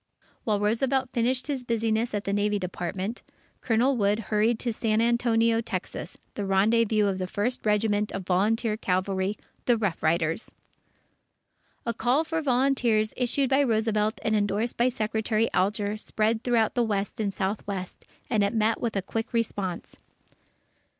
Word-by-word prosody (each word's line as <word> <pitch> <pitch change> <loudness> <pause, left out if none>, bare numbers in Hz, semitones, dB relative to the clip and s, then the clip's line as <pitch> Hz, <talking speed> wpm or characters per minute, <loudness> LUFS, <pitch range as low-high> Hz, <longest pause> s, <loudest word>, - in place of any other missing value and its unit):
While 210 -2 +1
Roosevelt 255 +5 +1
finished 250 +2 +1
his 275 -3 -2
business 225 -1 0
at 205 - -2
the 200 - -2
Navy 205 0 +1
Department, 185 +4 -4 0.4
Colonel 245 +4 +2
Wood 205 -2 +2
hurried 220 +1 +1
to 240 -2 -1
San 220 -1 0
Antonio, 230 -1 +2
Texas, 185 -6 -5 0.2
the 205 - -4
rendezvous 210 +2 +3
of 195 -2 0
the 185 - -2
First 215 +7 -1
Regiment 210 0 +1
of 195 -2 -5
Volunteer 210 +5 +1
Cavalry 190 +1 -1 0.3
the 240 -2 +4
Rough 200 -6 -1
Riders! 165 +4 0 1.3
A 235 - 0
call 245 +7 +2
for 325 0 -2
volunteers, 250 -5 +2
issued 255 +2 0
by 270 +2 +5
Roosevelt 220 -3 +1
and 220 - +1
endorsed 210 +3 0
by 240 +2 +3
Secretary 220 -1 0
Alger, 205 +2 0
spread 220 +1 -1
through 235 -3 +3
the 245 - +1
West 205 -3 -1
and 205 -2 0
Southwest, 195 -1 -4 0.2
and 215 -4 +2
it 200 +3 0
met 220 +1 +1
with 230 -3 -2
a 195 - 0
quick 225 +5 -4
response. 200 -6 -2
220 Hz, 150 wpm, -27 LUFS, 200-235 Hz, 1.3 s, by